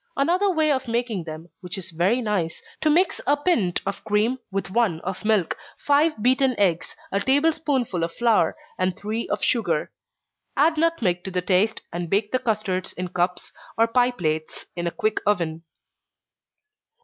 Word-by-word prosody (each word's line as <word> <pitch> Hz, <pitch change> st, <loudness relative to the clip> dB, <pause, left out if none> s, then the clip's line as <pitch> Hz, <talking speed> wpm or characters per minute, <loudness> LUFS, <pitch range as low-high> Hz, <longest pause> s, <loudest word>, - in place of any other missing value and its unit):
Another 355 Hz, +8 st, +2 dB
way 315 Hz, -4 st, +2 dB
of 265 Hz, -2 st, -1 dB
making 230 Hz, -6 st, -1 dB
them, 160 Hz, +1 st, -8 dB
which 180 Hz, 0 st, -3 dB
is 185 Hz, -1 st, -6 dB
very 185 Hz, +10 st, +1 dB
nice, 190 Hz, -7 st, -1 dB
is -, -, -16 dB, 0.2 s
to 310 Hz, -, +3 dB
mix 340 Hz, +3 st, +3 dB
a 290 Hz, +1 st, +4 dB
pint 260 Hz, -, +1 dB
of 195 Hz, 0 st, -4 dB
cream 215 Hz, +5 st, +1 dB
with 195 Hz, -1 st, -3 dB
one 210 Hz, -7 st, +1 dB
of 190 Hz, +3 st, -5 dB
milk, 210 Hz, -6 st, +2 dB, 0.2 s
five 290 Hz, -5 st, +2 dB
beaten 255 Hz, 0 st, +3 dB
eggs, 175 Hz, -5 st, +1 dB, 0.2 s
a 200 Hz, -, +1 dB
table 285 Hz, +8 st, +3 dB
spoonful 255 Hz, -, -1 dB
of 165 Hz, -, -1 dB
flour, 235 Hz, -, +2 dB, 0.2 s
and 185 Hz, -1 st, 0 dB
three 220 Hz, +3 st, -3 dB
of -, -, -2 dB
sugar. 235 Hz, -3 st, +1 dB, 0.7 s
Add 315 Hz, +3 st, +4 dB
nutmeg 240 Hz, -, +1 dB
to -, -, -2 dB
the 180 Hz, -1 st, -2 dB
taste, 195 Hz, +4 st, +2 dB
and 175 Hz, -1 st, -3 dB
bake 205 Hz, +3 st, +1 dB
the 255 Hz, -, +1 dB
custards 215 Hz, -6 st, -2 dB
in 180 Hz, 0 st, -4 dB
cups 180 Hz, 0 st, -1 dB, 0.3 s
or 225 Hz, -, +5 dB
pie 245 Hz, +2 st, +3 dB
plates, 155 Hz, -9 st, -3 dB
in 175 Hz, -1 st, -2 dB
a -, -, -1 dB
quick 215 Hz, +4 st, 0 dB
oven. 170 Hz, -6 st, 0 dB
210 Hz, 175 wpm, -24 LUFS, 180-260 Hz, 0.7 s, or